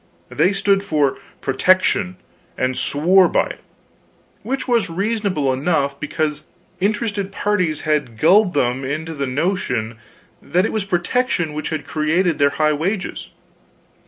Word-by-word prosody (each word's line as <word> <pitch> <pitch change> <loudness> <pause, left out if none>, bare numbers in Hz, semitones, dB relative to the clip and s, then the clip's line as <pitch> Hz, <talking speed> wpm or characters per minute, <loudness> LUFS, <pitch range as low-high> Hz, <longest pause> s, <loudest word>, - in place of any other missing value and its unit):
They 185 - +2
stood 195 0 +1
for 150 -7 0 0.2
"protection," 185 +6 +2 0.4
and 130 0 0
swore 180 +8 +3
by - - +1
it, - - -13 0.8
which 270 +1 -3
was 230 -7 +2
reasonable 195 -6 0
enough, 140 0 0
because 150 0 -2 0.3
interested 205 0 -1
parties 185 -6 0
had 150 -7 -1
gulled 185 - +4
them 130 -1 +1
into 155 +5 -3
the 140 -3 -3
notion 125 - -1 0.4
that 180 +3 +1
it - - -2
was 215 -3 -1
protection 175 - 0
which 155 +1 -4
had 155 - -4
created 160 +3 0
their 140 0 +5
high 155 +1 +1
wages. 185 +6 -3
165 Hz, 130 wpm, -20 LUFS, 145-195 Hz, 0.8 s, their